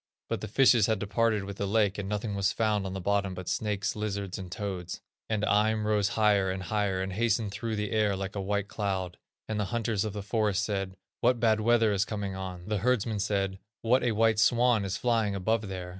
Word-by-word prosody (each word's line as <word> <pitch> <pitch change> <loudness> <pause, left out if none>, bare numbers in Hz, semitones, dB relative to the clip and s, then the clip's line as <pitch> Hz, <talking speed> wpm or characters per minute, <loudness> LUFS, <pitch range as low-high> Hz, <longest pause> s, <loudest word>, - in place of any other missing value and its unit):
But - - -2
the - - -4
fishes 120 -1 +5
had 110 -1 +1
departed 105 +1 0
with 100 0 -7
the 100 - -2
lake, 105 -1 +2
and 100 -1 -4
nothing 105 0 -2
was 100 -1 +1
found 105 -3 0
on 95 - -5
the 95 - -4
bottom 100 0 0
but 90 -1 -7
snakes, 105 -2 -1
and 105 - -7
lizards, 100 -3 -3
and 90 -2 -8
toads. 95 -3 -4 0.3
And 110 -2 0
Eim 105 +1 +2
rose 105 -2 +2
higher, 105 -3 +3
and 95 0 -3
higher, 100 -1 0
and 95 0 -4
hastened 110 0 +1
through 110 +2 -3
the 105 -1 -3
air 105 -2 +2
like 95 +1 -5
a 100 - -2
white 100 +1 -1
cloud. 95 -4 -3 0.3
And 110 -1 -2
the 105 - 0
hunters 115 -2 -1
in 110 - -3
the 105 -1 -5
forest 105 -2 0
said: 95 -2 -3 0.2
'What 120 0 +2
bad 110 -2 +3
weather 115 -1 +3
is 100 0 +2
coming 100 -3 -4
on!' 95 -2 -6
The 105 0 -1
herdsmen 115 -1 +1
said: 100 -1 -1 0.2
'What 125 +3 +3
a 120 -2 +1
white 110 0 +3
swan 120 -2 +3
is 95 0 -2
flying 115 -4 +1
above 110 +3 0
there! 90 -2 -5
105 Hz, 225 wpm, -29 LUFS, 95-110 Hz, 0.3 s, fishes